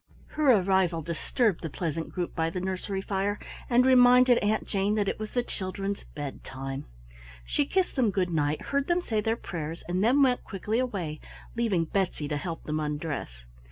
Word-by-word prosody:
Her 300 Hz, -3 st, +3 dB
arrival 190 Hz, -4 st, +2 dB
disturbed 170 Hz, -, 0 dB
the 165 Hz, -, -4 dB
pleasant 165 Hz, +1 st, -3 dB
group 175 Hz, -2 st, -3 dB
by 165 Hz, -1 st, 0 dB
the 180 Hz, -, -4 dB
nursery 190 Hz, +1 st, -3 dB
fire, 200 Hz, +1 st, -1 dB, 0.3 s
and 250 Hz, 0 st, +5 dB
reminded 250 Hz, -1 st, +7 dB
Aunt 215 Hz, +1 st, 0 dB
Jane 200 Hz, +1 st, 0 dB
that 205 Hz, -2 st, +1 dB
it -, -, -2 dB
was 215 Hz, 0 st, -5 dB
the 245 Hz, -, +1 dB
children's 195 Hz, -1 st, -4 dB
bedtime. 135 Hz, -1 st, -6 dB, 0.6 s
She 285 Hz, -, 0 dB
kissed 375 Hz, +2 st, 0 dB
them 250 Hz, -6 st, +3 dB
good 185 Hz, -3 st, 0 dB
night, 150 Hz, -2 st, 0 dB
heard 280 Hz, 0 st, +1 dB
them 350 Hz, 0 st, +1 dB
say 220 Hz, -7 st, 0 dB
their 225 Hz, +2 st, +1 dB
prayers, 165 Hz, -4 st, -5 dB
and 180 Hz, +2 st, 0 dB
then 265 Hz, +5 st, +5 dB
went 250 Hz, -2 st, +2 dB
quickly 210 Hz, +3 st, -2 dB
away, 185 Hz, -12 st, -2 dB, 0.4 s
leaving 210 Hz, -8 st, +1 dB
Betsy 180 Hz, -4 st, -1 dB
to 150 Hz, -, -1 dB
help 165 Hz, +2 st, -5 dB
them 155 Hz, 0 st, -2 dB
undress. 150 Hz, -, -4 dB
190 Hz, 180 wpm, -28 LUFS, 165-230 Hz, 0.6 s, reminded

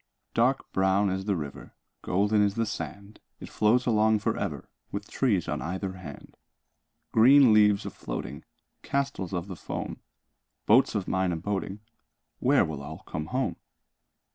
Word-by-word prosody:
Dark 130 Hz, +4 st, +1 dB
brown 95 Hz, +1 st, +2 dB
is 95 Hz, +1 st, -3 dB
the 100 Hz, -2 st, +1 dB
river, 75 Hz, -5 st, -7 dB, 0.3 s
Golden 105 Hz, +3 st, +2 dB
is 100 Hz, -1 st, +2 dB
the 115 Hz, -, 0 dB
sand. 100 Hz, +1 st, -7 dB, 0.2 s
It -, -, -9 dB
flows 115 Hz, +4 st, +2 dB
along 110 Hz, -2 st, +3 dB
for 105 Hz, -, -1 dB
ever, -, -, -4 dB, 0.2 s
With 100 Hz, +1 st, -5 dB
trees 105 Hz, -, +1 dB
on -, -, -2 dB
either 95 Hz, +3 st, -3 dB
hand. 95 Hz, -1 st, -11 dB, 0.7 s
Green 130 Hz, +1 st, +7 dB
leaves 105 Hz, -1 st, +4 dB
a -, -, -4 dB
floating, -, -, -6 dB, 0.4 s
Castles 140 Hz, -10 st, -2 dB
of 90 Hz, 0 st, -3 dB
the 95 Hz, -, -6 dB
foam, -, -, -6 dB, 0.7 s
Boats 115 Hz, +2 st, +4 dB
of 100 Hz, -3 st, -2 dB
mine 95 Hz, -1 st, +1 dB
a -, -, -1 dB
boating— 100 Hz, +3 st, -3 dB, 0.6 s
Where -, -, +4 dB
will 75 Hz, -3 st, -5 dB
all 75 Hz, +2 st, -9 dB
come 75 Hz, +1 st, -5 dB
home? 130 Hz, +6 st, -1 dB
100 Hz, 155 wpm, -27 LUFS, 95-110 Hz, 0.7 s, Green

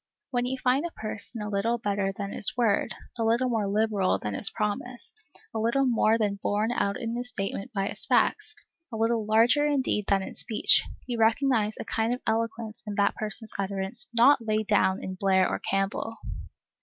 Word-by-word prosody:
When 245 Hz, -1 st, 0 dB
you 265 Hz, +1 st, -2 dB
find 260 Hz, +3 st, +2 dB
a 345 Hz, -, -2 dB
person 215 Hz, +1 st, -5 dB
a 210 Hz, -, -4 dB
little 215 Hz, +4 st, 0 dB
better 200 Hz, -3 st, -1 dB
than 200 Hz, 0 st, -5 dB
his 210 Hz, -, -2 dB
word, 225 Hz, -5 st, +1 dB, 0.2 s
a -, -, +1 dB
little 235 Hz, +3 st, +2 dB
more 220 Hz, -4 st, 0 dB
liberal 210 Hz, -2 st, +1 dB
than 105 Hz, -, -4 dB
his -, -, +2 dB
promise, 225 Hz, +3 st, -4 dB, 0.4 s
a 220 Hz, -, -2 dB
little 235 Hz, +5 st, +2 dB
more 225 Hz, -2 st, +3 dB
than 205 Hz, -3 st, -1 dB
borne 210 Hz, +3 st, 0 dB
out 200 Hz, -4 st, 0 dB
in 230 Hz, 0 st, -3 dB
his 245 Hz, 0 st, -4 dB
statement 195 Hz, +1 st, -4 dB
by 195 Hz, -4 st, -1 dB
his -, -, -5 dB
facts, -, -, +1 dB, 0.4 s
a 225 Hz, -, -4 dB
little 225 Hz, -1 st, +1 dB
larger 235 Hz, +7 st, +4 dB
in 285 Hz, -3 st, +1 dB
deed 210 Hz, -5 st, 0 dB
than 195 Hz, -1 st, +2 dB
in -, -, -7 dB
speech, 220 Hz, -, +3 dB, 0.2 s
you 240 Hz, -2 st, -3 dB
recognize 225 Hz, -1 st, +2 dB
a -, -, -5 dB
kind 225 Hz, +2 st, 0 dB
of 250 Hz, -, -13 dB
eloquence 225 Hz, 0 st, -2 dB
in 205 Hz, -, -4 dB
that 200 Hz, 0 st, +2 dB
person's 215 Hz, +1 st, -4 dB
utterance 195 Hz, +4 st, -2 dB
not 240 Hz, +2 st, +5 dB
laid 215 Hz, -1 st, 0 dB
down 200 Hz, -2 st, +2 dB
in 185 Hz, -, -4 dB
Blair 190 Hz, -1 st, +2 dB
or -, -, -2 dB
Campbell. 195 Hz, +3 st, -2 dB
220 Hz, 195 wpm, -27 LUFS, 200-235 Hz, 0.4 s, not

